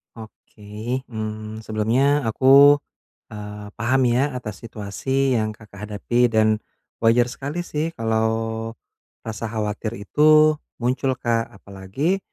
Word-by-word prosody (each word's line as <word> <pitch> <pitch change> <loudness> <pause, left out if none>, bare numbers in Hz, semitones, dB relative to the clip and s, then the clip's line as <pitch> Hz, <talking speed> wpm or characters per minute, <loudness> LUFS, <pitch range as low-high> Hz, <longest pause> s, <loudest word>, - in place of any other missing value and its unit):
Oke, 110 +2 -7
mmm, 110 0 -5
sebelumnya 125 +7 +1
aku, 140 +5 +6 0.5
eee, 105 -1 -8
paham 130 +4 +2
ya 130 +3 +1
atas 110 -5 -6
situasi 125 +5 -1
yang 110 -1 -2
Kakak 105 -1 -11
hadapi 120 +4 +1
dan 110 0 +4 0.5
wajar 120 +2 +3
sekali 145 +7 -4
sih 160 0 -3
kalau 110 0 -1 0.5
rasa 110 0 -5
khawatir 110 0 -3
itu 155 +8 +4 0.3
muncul 130 +2 +1
Kak, 115 -2 -1
apalagi 100 - -3
115 Hz, 110 wpm, -22 LUFS, 110-135 Hz, 0.5 s, aku